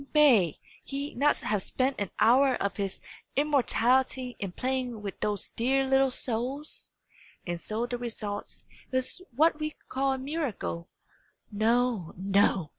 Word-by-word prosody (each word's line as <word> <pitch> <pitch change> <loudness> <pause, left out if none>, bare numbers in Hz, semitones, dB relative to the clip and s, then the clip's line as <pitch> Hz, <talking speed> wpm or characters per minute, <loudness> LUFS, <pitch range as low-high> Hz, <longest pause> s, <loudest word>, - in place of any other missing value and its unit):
May 235 - +5 0.3
he 280 +1 -4
not 290 +4 +3
have 210 -2 0
spent 260 +4 -1
an 200 - -1
hour 255 +4 +5
of 200 - -2
his 195 -2 -3 0.4
immortality 260 -3 +2
in 195 -3 -3
playing 250 0 -2
with 200 - -5
those 205 -2 -2
dear 270 +3 +1
little 270 0 +4
souls? 255 +4 -4 0.6
and 175 -1 -3
so 220 +2 -2
the 245 0 -4
result 215 -4 -5 0.3
is 260 +7 -2
what 315 +3 +4
we 305 0 -3
call 270 +1 +1
a - - -2
miracle. 260 - -3 0.6
No, 225 -3 +1
no! 195 -3 +2
245 Hz, 135 wpm, -29 LUFS, 205-270 Hz, 0.6 s, May